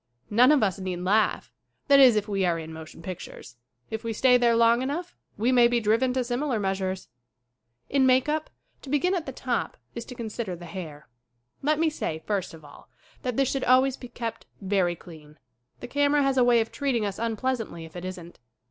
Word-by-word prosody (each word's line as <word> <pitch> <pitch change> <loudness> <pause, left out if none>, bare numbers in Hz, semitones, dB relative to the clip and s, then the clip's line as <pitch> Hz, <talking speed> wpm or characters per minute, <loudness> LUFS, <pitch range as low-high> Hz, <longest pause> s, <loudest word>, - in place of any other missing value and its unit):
None 245 +6 +6
of 295 -6 +4
us 195 -1 0
need 185 -2 -4
laugh; 210 +4 +1 0.4
that 280 -2 +6
is 255 -4 +8
if 210 0 0
we 200 -2 -1
are 175 -2 +1
in 160 0 -7
motion 160 +1 -11
pictures. 185 -8 -8 0.4
If 220 +1 -4
we 230 -1 -2
stay 250 +3 +4
there 240 -1 +4
long 230 +1 +4
enough 315 +7 -4 0.2
we 230 +5 +1
mav 240 -2 +5
be 240 0 +2
driven 230 +4 +2
to 255 -1 0
similar 245 0 -1
measures. 190 -1 -2 0.8
m 280 - -2
In - - +5
make 255 +1 +4
up, 310 +1 -1 0.3
to 275 - -11
begin 295 +7 +1
at 345 -4 -2
the - - -3
top, - - -3 0.2
is 235 - -5
to 250 - -10
consider 220 -4 -4
the 175 0 -11
hair. 160 -4 -8 0.5
Let 300 +2 +1
me 320 0 +2
say, 160 - -4
first 195 -5 -2
of 155 -2 -15
all, 145 - -15 0.3
that 250 -2 -3
this 270 -1 +2
should 270 -1 -2
always 255 +1 +4
be 250 - -10
kept 230 -1 -6
very 190 -3 0
clean. 155 -3 -14 0.4
The - - -6
camera 285 +2 +2
has 275 -1 +1
a - - +6
way 240 -1 +5
of 225 - -4
treating 260 -6 -1
us 200 -1 -4
unpleasantly 230 -6 -2
if 160 - -15
it 175 - -6
isn't. 180 -2 -8
230 Hz, 210 wpm, -26 LUFS, 185-260 Hz, 0.8 s, is